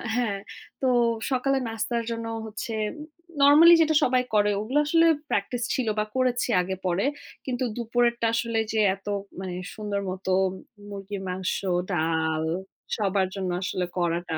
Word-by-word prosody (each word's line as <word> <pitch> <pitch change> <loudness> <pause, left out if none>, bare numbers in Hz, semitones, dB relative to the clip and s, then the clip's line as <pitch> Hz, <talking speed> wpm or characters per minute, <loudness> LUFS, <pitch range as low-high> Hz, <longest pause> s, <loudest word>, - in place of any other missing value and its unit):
হ্যাঁ, 230 -5 0 0.4
তো 265 - +2 0.4
সকালের 265 +1 +1
নাস্তার 230 +1 -2
জন্য 230 0 -4 0.2
হচ্ছে 220 +2 -5 0.2
উম 300 - -8 0.4
নরমালি 300 +5 +8
যেটা 315 0 +3
সবাই 250 0 +3
করে 210 -1 +4
ওগুলা 255 +7 +1
আসলে 330 +2 +4 0.2
practice 235 +4 -1
ছিলো 240 -5 0
বা 210 - +1
করেছি 255 -1 +1
আগে 190 +1 -3
পরে। 180 +6 +1 0.4
কিন্তু 255 -1 -2
দুপুরেরটা 235 0 +1
আসলে 230 -1 0
যে, 220 - 0 0.2
এত 195 +1 -20 0.3
মানে 185 -1 -5 0.2
সুন্দর 210 -2 -3
মত 185 +1 -6 0.6
মুরগির 200 0 -6
মাংস, 185 0 -2 0.4
ডাল, 160 -1 0 0.5
সবার 195 -3 +1
জন্য 190 -2 -2
আসলে 180 -1 -1
কড়াটা, 170 -1 -1
220 Hz, 140 wpm, -26 LUFS, 190-245 Hz, 0.6 s, নরমালি